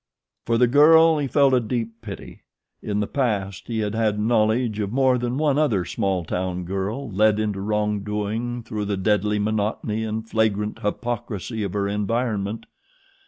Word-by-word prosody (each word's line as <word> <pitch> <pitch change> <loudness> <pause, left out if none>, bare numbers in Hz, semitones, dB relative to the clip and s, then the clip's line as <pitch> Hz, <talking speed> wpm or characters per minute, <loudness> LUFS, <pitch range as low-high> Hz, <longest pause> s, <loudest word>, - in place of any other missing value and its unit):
For 115 - +2
the 125 - +5
girl 160 +5 +6
he 140 - -1
felt 140 0 +3
a 130 - +5
deep 115 0 -4
pity. 100 -4 -9 0.4
In 105 0 -2
the - - 0
past 100 -8 -2
he 115 -2 -2
had 105 -1 -2
had 110 -2 0
knowledge 110 0 +1
of 100 -1 -2
more 130 0 +3
than 120 +1 -2
one 150 -1 +2
other 110 - +1
small 90 0 -1
town 90 +1 -3
girl 100 +7 -3
led 105 +2 +3
into 105 -2 -2
wrong 105 0 0
doing 105 +4 -3
through 110 -2 -4
the 100 -1 -2
deadly 105 +1 +1
monotony 105 +1 -1
and 110 0 -4
flagrant 105 -2 0
hypocrisy 110 0 -3
of 100 -3 -3
her 100 -1 0
environment. 105 +1 -2
110 Hz, 165 wpm, -23 LUFS, 105-120 Hz, 0.4 s, girl